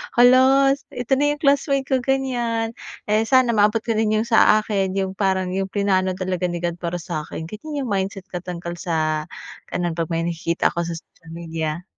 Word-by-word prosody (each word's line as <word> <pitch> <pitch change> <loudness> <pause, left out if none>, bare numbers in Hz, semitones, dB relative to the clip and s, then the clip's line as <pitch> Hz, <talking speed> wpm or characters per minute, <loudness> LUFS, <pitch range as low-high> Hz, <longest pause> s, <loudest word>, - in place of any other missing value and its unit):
"Hala 260 +3 +6 0.2
ito 245 0 -6
na 290 - +3
yung 295 - -20
classmate 275 -1 +2
ko," 265 - +3
ganyan, 245 -4 -1 0.4
"eh, 215 +1 +3
sana 255 -2 +4
maabot 215 +1 +3
ko 230 - -2
din 215 -1 +2
yung 230 - -4
sa 220 -2 +5
akin 195 -3 -1
yung 190 -1 -1
parang 190 -2 0
yung 195 0 -1
plinano 190 -2 0
talaga 185 -1 -2
ni 175 0 -5
God 170 0 -2
para 170 0 -3
sa'kin." 160 -2 -5
Ganiyan 285 - -5
yung 235 - -4
mindset 195 -1 -2
ko 180 - -3
tungkol 175 -1 -6
sa 155 -3 -1 0.4
ganun 175 -1 -1
'pag 165 -1 -1
may 165 0 0
nakikita 170 0 0
ako 170 0 -2
sa 170 - -4
social 165 0 -14
media. 165 -1 -4
190 Hz, 190 wpm, -22 LUFS, 170-235 Hz, 0.4 s, Hala